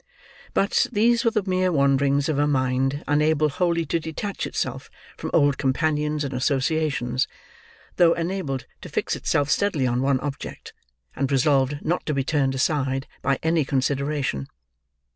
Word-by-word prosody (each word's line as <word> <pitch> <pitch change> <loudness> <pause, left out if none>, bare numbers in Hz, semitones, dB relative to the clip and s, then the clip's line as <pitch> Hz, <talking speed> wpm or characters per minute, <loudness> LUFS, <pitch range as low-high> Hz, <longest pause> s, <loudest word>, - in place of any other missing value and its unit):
But, 200 - +2
these 235 +3 +3
were 230 - +4
the 215 -3 -1
mere 185 0 +1
wanderings 140 -1 +2
of 150 -3 0
a 145 - +3
mind 135 0 0
unable 150 +1 +2
wholly 170 +2 0
to 165 +3 0
detach 160 +6 -4
itself - - -4 0.3
from - - -5
old 145 -4 +3
companions 150 +2 0
and 140 - -4
associations, 135 -1 0 0.7
though 170 -2 +6
enabled 165 -7 -3 0.2
to - - -9
fix - - -1
itself 145 0 0
steadily 180 -10 +1
on 125 0 +1
one 135 -1 +2
object, 145 -2 -6 0.4
and 135 0 -1
resolved 135 0 +2
not 175 +3 0
to 150 - 0
be 135 - +1
turned 135 -1 0
aside 135 -1 0 0.2
by 135 0 +1
any 160 -1 +2
consideration. 140 - -1
145 Hz, 150 wpm, -24 LUFS, 135-160 Hz, 0.7 s, though